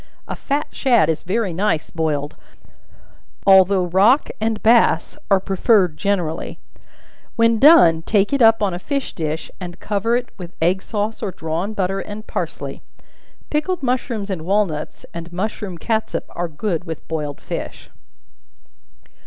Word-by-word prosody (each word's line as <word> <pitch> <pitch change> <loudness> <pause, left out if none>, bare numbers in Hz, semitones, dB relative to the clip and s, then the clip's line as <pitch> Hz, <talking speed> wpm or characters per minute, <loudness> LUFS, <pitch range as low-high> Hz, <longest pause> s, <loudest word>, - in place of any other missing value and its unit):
A - - -4
fat 290 +2 -2
shad 235 - +3
is 160 - -1
very 195 0 -1
nice 180 -3 -1
boiled, 150 -3 -2 1.1
although 190 -1 +6
rock 200 - +3
and 220 0 0
bass 225 -7 +3
are 195 -2 +5
preferred 190 -2 +2
generally; 175 -3 -2 0.8
when 230 -1 +3
done, 175 - +7
take 205 +6 +1
it 280 - +1
up 225 -1 +5
on 195 -3 +1
a 175 - -4
fish 275 +6 -3
dish, 155 -1 -4
and 175 -1 -8
cover 210 +3 0
it 245 0 -2
with 180 -1 -9
egg 180 +4 +1
sauce 215 +1 -3
or 210 - -2
drawn 170 +4 -3
butter 195 -1 -1
and 210 +2 -7
parsley. - - -5 0.7
Pickled 305 +2 -1
mushrooms 240 -5 -2
and 180 -4 -3
walnuts, 180 -4 -1
and 170 0 -7
mushroom 190 0 -4
catsup, 220 +5 -2
are 175 - -3
good 170 +2 -3
with 160 -3 -7
boiled 150 -3 -4
fish. - - -7
195 Hz, 145 wpm, -20 LUFS, 170-225 Hz, 1.1 s, done